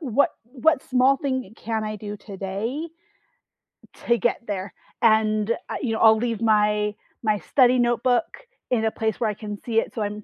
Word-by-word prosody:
what 280 -2 +2
what 270 +5 +1
small 260 +1 +3
thing 260 -7 -3
can 220 -1 -3
I 215 0 -4
do 210 0 -7
today 205 - -4 1.2
to 235 0 +4
get 240 - 0
there? 195 -2 -4 0.3
And, 215 -1 +3 0.2
uh, - - -3
you 230 -4 -1
know, 220 - -2
I'll 220 -1 +6
leave 230 -1 -2
my 210 -1 +2 0.3
my 215 -2 +1
study 255 +1 +3
notebook 240 +3 +2 0.5
in 230 -3 +1
a 220 - +1
place 220 -1 -2
where 225 -3 +1
I - - -1
can 210 0 -7
see 225 -2 +2
it - - -4
so 220 - -1
I'm 210 0 -5
220 Hz, 180 wpm, -24 LUFS, 210-245 Hz, 1.2 s, I'll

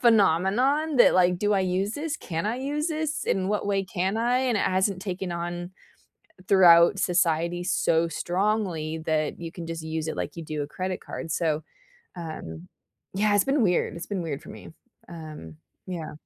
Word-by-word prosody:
phenomenon 235 - +3
that, 245 - +7
like, 180 -1 +4
"Do 205 +2 +1
I 195 - +2
use 190 +2 0
this? 300 +1 -3
Can 165 +1 -4
I 225 +3 -1
use 290 +4 -2
this? 310 -1 -2
In 190 -1 0
what 210 0 -1
way 195 -1 +1
can 190 +2 -1
I?" 240 +2 +2
and 255 -3 +1
it - - 0
hasn't 190 0 +1
taken 185 -2 -4
on, 175 +1 -4 0.8
throughout 175 -1 +7
society, 175 -1 +1
so 170 -2 +2
strongly 175 -2 -1
that 155 -1 -1
you 165 -1 -6
can 170 - -7
just 165 0 -5
use 160 0 -3
it - - -5
like - - -4
you 165 - -5
do 155 -1 -3
a - - -7
credit 185 +3 -4
card, 165 - -6
so, 155 -1 0 0.5
um, 90 - -7 0.5
yeah, 205 +2 +2
it's 205 - +5
been 270 0 +2
weird 180 -3 +1
it's 170 - -6
been 195 -3 -3
weird 150 -4 -4
for - - -11
me, - - -11 0.4
um, 155 - -9 0.3
yeah. 170 -4 -5
180 Hz, 185 wpm, -26 LUFS, 165-210 Hz, 0.8 s, that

